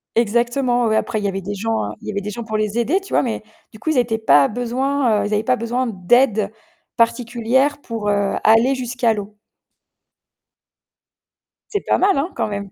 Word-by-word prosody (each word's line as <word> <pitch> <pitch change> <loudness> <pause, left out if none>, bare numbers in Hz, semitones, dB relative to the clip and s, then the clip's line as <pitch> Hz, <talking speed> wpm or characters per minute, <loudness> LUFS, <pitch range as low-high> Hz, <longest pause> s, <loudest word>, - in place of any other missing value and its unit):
Exactement 240 +2 +1
ouais. 220 - +1
Après 220 0 0
il 205 - -4
y - - +2
avait 195 0 -3
des 205 +2 -5
gens 210 - -2
il - - -11
y - - -2
avait 200 0 -3
des 210 +1 -5
gens 235 +3 -6
pour 220 -1 -3
les 215 +1 -1
aider 300 - +1
tu 390 - -11
vois, - - +4
mais 230 -4 -3 0.3
du 215 - -14
coup 315 - -1
ils 285 - 0
étaient 230 -2 +1
pas 145 -11 +4
besoin, 245 -1 0
heu - - -2
ils 210 - -3
avaient 210 +1 +1
pas 255 0 +2
besoin 240 +2 -2
d'aide 215 +1 +2 0.5
particulière 240 +4 +1
pour 225 -5 -4
heu 200 -1 +1
aller 230 +5 +4
jusqu'à 245 -2 0
l'eau. 205 0 -7 2.4
C'est 410 - -1
pas - - +1
mal 390 -4 +3
hein? 315 +7 -1
Quand - - -1
même. 200 -1 -5
230 Hz, 205 wpm, -20 LUFS, 210-250 Hz, 2.4 s, vois